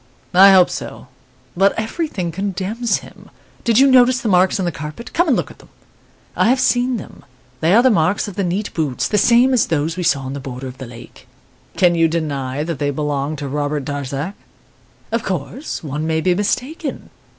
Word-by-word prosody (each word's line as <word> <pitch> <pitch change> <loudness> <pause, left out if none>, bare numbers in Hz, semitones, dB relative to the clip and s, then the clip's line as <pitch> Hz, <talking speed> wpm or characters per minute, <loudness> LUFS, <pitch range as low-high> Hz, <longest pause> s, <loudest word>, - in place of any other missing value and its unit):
I 195 +2 +8
hope 185 -2 +5
so; - - -7 0.5
but 195 +3 +2
everything 220 - -3
condemns 200 +6 -2
him. - - -16 0.3
Did 230 -2 +2
you 270 - +7
notice 255 -1 +5
the 235 - -2
marks 185 0 +3
on 185 - -1
the 175 - 0
carpet? 155 - -8
Come 345 +2 +2
and 265 - +3
look - - -3
at - - -17
them.' - - -18 0.7
"'I - - +2
have 260 +1 +3
seen 245 0 +2
them; 200 - -11 0.4
they 165 +7 +3
are 235 - +6
the 260 - +5
marks 190 +2 +1
of 205 - -6
the 200 - -1
neat 190 +4 -2
boots, 150 -6 -1
the 210 - +1
same 240 +5 +4
as 250 - +2
those 160 +2 -1
we - - -2
saw 145 -5 +1
on 130 0 -6
the 140 - -5
border 130 -1 -7
of 130 0 -9
the 130 - -7
lake.' 115 -1 -13 0.5
"'Can 175 -2 +4
you 165 -1 +3
deny 145 -4 -2
that 165 -3 -4
they 145 - 0
belong 145 0 -2
to 145 -1 -5
Robert 145 0 -2
Darzac?' 145 +4 -4 0.8
"'Of 230 +1 0
course, 195 - -5
one 150 +1 -3
may 160 0 +1
be 180 +3 +2
mistaken. 255 - -3
175 Hz, 205 wpm, -19 LUFS, 145-225 Hz, 0.8 s, I